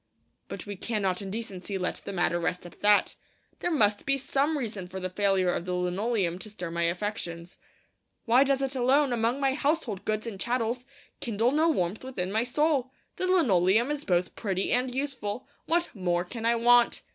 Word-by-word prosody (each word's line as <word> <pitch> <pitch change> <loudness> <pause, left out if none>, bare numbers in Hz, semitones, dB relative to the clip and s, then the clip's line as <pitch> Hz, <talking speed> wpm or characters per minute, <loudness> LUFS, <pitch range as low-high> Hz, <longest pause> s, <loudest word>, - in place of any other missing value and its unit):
But - - -7
we 205 -1 -5
cannot 195 -3 -1
in 195 - -6
decency 195 -3 -4
let 180 -1 -1
the - - -7
matter 175 -2 +1
rest 175 +1 -2
at 175 - -12
that. 205 0 +4 0.5
There - - -1
must 210 -10 +2
be 275 0 +1
some 280 +3 0
reason 215 -8 -4
for 190 +1 -6
the 185 0 -4
failure 190 -2 +2
of 170 - -3
the 180 0 -2
linoleum 180 0 0
to 215 - -8
stir 180 -5 -6
my 170 0 0
affections. 175 -2 -4 0.7
Why 245 +2 +6
does 275 -1 +1
it 270 0 -1
alone, 260 +2 +3
among 235 +3 +1
my 270 -1 +2
household 275 - -1
goods 215 +1 -1
and 215 -5 -6
chattels, 245 +2 -1 0.3
kindle 230 +1 +1
no 315 +3 +3
warmth 190 - -1
within 195 -8 -3
my 220 +2 +2
soul? 275 +1 +1 0.3
The 370 - -1
linoleum 235 - +3
is 295 -1 -3
both 180 -1 0
pretty 195 -3 -1
and 250 +1 +2
useful; 255 -4 -3 0.2
what 340 +1 +1
more 175 -3 0
can 225 +5 -4
I 235 - +4
want? 240 +1 +4
220 Hz, 190 wpm, -28 LUFS, 185-260 Hz, 0.7 s, Why